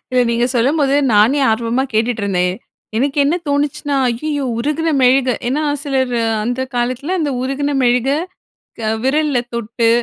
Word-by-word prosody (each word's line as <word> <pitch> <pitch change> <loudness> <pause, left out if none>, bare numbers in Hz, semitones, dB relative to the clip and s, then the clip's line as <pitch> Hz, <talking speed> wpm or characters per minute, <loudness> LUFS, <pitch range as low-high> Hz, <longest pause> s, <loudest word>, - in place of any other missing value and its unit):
இல்ல, 255 0 +2
நீங்க 235 +1 +1
சொல்லும்போது 275 +3 +2 0.2
நானே 230 +8 +4
ஆர்வமா 230 +3 0
கேட்டுட்ருந்தேன். 200 -6 0 0.4
எனக்கு 275 +4 0
என்ன 295 +5 +2
தோணுச்சுனா, 285 0 -1
ஐயயோ 285 +4 -2
உருகின 300 +6 -1
மெழுகை 255 -1 +4
ஏன்னா 280 +5 0 0.2
சிலர் 265 -3 0 0.3
அந்த 245 +3 -2
காலத்தில 255 +8 -1
அந்த 295 -3 0
உருகின 275 +2 -1
மெழுகை 250 +3 +2 0.6
க 220 -1 -1
விரல்ல 295 0 +1 0.2
தொட்டு 230 0 -1
255 Hz, 130 wpm, -17 LUFS, 235-285 Hz, 0.6 s, நானே